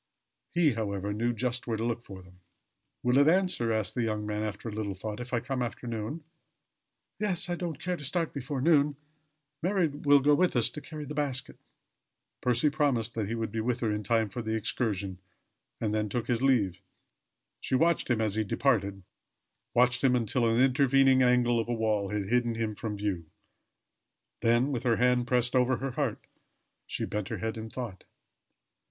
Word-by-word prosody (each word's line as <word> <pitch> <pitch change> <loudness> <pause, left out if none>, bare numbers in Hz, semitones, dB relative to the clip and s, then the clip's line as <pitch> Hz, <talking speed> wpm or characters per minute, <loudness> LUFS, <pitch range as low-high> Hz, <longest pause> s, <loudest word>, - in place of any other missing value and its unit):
He, 170 -4 +3
however 100 -2 -2
knew 115 +3 0
just 125 +1 -2
where 115 -2 -1
to 115 - -2
look 120 0 -1
for 95 -5 -11
them. 90 0 -19 0.6
"Will 125 +2 +4
it 145 - +5
answer," 175 -9 +2
asked 110 -2 -1
the 125 - -1
young 110 -2 -1
man 105 0 -2
after 105 +1 -4
a - - -3
little 105 -2 -3
thought, 105 +3 -5
"if 125 0 -7
I 120 - +1
come 125 +2 -3
after 120 +1 -4
noon?" 115 +7 -4 1.0
"Yes 185 -4 0
I 175 - 0
don't 170 -5 -4
care 180 +1 -2
to 150 - -9
start 165 +3 -1
before 140 -1 -3
noon. 150 -1 +4 0.7
Mary 185 -1 +2
will 145 0 +4
go 145 +2 +4
with 180 +2 +2
us 120 - +2
to 150 - -7
carry 155 -1 -7
the 150 - -6
basket." 140 -3 -2 0.8
Percy 125 +4 +2
promised 130 -7 +1
that 110 -3 -2
he 115 - -2
would 115 -2 -3
be 115 - -3
with 120 +2 -1
her 110 -3 +1
in 105 - -2
time 110 +1 +1
for 110 +5 -5
the 110 0 -2
excursion 100 -4 -2 0.6
and 105 -2 -1
then 105 -1 0
took 120 +2 -2
his 120 -1 0
leave. 105 -9 +2 0.8
She - - -1
watched 165 +3 +2
him 120 -2 +2
as 110 -2 0
he 110 +1 +1
departed 100 -4 0 0.7
watched 125 +1 +3
him 130 -2 +4
until 120 0 +1
an 115 +1 +2
intervening 135 0 +4
angle 125 -1 +4
of 115 - -2
a 120 - +1
wall 105 -3 0
had 105 -1 -2
hidden 120 +1 +1
him 110 -1 -2
from 105 0 -5
view. 95 -5 -2 1.1
Then 120 +4 +3
with 125 -4 -1
her 120 -2 +2
hand 125 +1 +2
pressed 125 0 +1
over 130 0 +3
her 135 0 -3
heart, 130 -3 -2 0.6
she - - -2
bent 105 -2 -3
her - - -3
head 110 0 -3
in 110 0 -6
thought. 110 -6 -7
120 Hz, 195 wpm, -29 LUFS, 110-135 Hz, 1.1 s, it